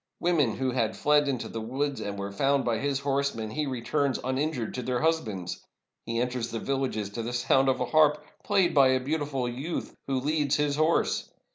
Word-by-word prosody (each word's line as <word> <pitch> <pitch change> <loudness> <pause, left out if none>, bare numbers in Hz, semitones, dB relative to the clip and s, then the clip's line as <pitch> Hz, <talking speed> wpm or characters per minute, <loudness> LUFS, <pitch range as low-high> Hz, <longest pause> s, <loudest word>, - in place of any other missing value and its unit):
Women 155 -10 +2
who 130 -1 -1
had 115 -3 0
fled 150 0 +3
into 130 -4 -2
the 115 - -5
woods, 135 +5 -2
and 100 0 -4
were 100 0 -4
foimd 135 +7 +1
by 115 -2 +1
his 140 -1 -1
horsemen, 140 -6 -1
he 150 +4 -2
returns 130 +2 0
uninjured 130 -2 -1
to 125 - -3
their 125 0 -1
husbands. 110 - -1 0.4
He 115 0 -1
enters 125 -1 -1
the 115 - -4
villages 130 -6 -2
to 115 - -4
the 120 +2 -4
sound 135 +2 +3
of 130 - +1
a 125 - 0
harp, 150 +1 +3 0.2
played 195 -4 +2
by 140 -2 +6
a 130 0 +3
beautiful 140 -2 -2
youth, 135 +8 -4
who 135 -1 0
leads 150 +1 +1
his 145 -1 +1
horse. 155 +2 +1
135 Hz, 200 wpm, -28 LUFS, 120-145 Hz, 0.4 s, by